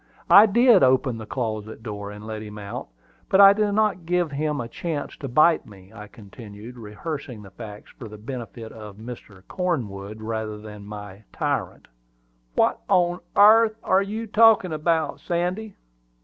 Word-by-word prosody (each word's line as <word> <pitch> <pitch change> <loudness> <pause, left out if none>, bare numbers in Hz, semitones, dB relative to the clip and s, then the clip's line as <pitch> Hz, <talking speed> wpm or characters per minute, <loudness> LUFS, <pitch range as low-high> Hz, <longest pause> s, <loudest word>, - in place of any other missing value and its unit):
I 205 +3 +9
did 235 0 +5
open 130 -2 +2
the 110 - -9
closet 110 -3 -4
door 105 -2 -6
and 105 +1 -10
let 110 -1 -6
him 105 -1 -9
out; 100 -1 -7 0.4
but 190 - +3
I 200 0 +10
did 210 0 0
not 210 -5 0
give 175 -3 +1
him 150 +1 -2
a 115 - -4
chance 150 +3 -5
to 140 - -6
bite 155 +6 +3
me," 100 -1 -16
I 105 -2 -10
continued, 110 +1 -12
rehearsing 120 +1 -7
the 95 - -13
facts 105 0 -10
for 120 - -7
the 105 0 -11
benefit 115 0 -8
of 105 -2 -11 0.5
Cornwood 110 - -3
rather 110 -1 -4
than 105 -1 -11
my 105 -1 -9
tyrant. - - -3 0.7
"What - - +2
on 175 0 +2 0.2
airth 220 +2 +6
are 190 - +3
you 215 +3 -4
talking 220 -5 +4
about, 155 0 0
Sandy? 180 +5 -3
125 Hz, 160 wpm, -24 LUFS, 105-180 Hz, 0.7 s, I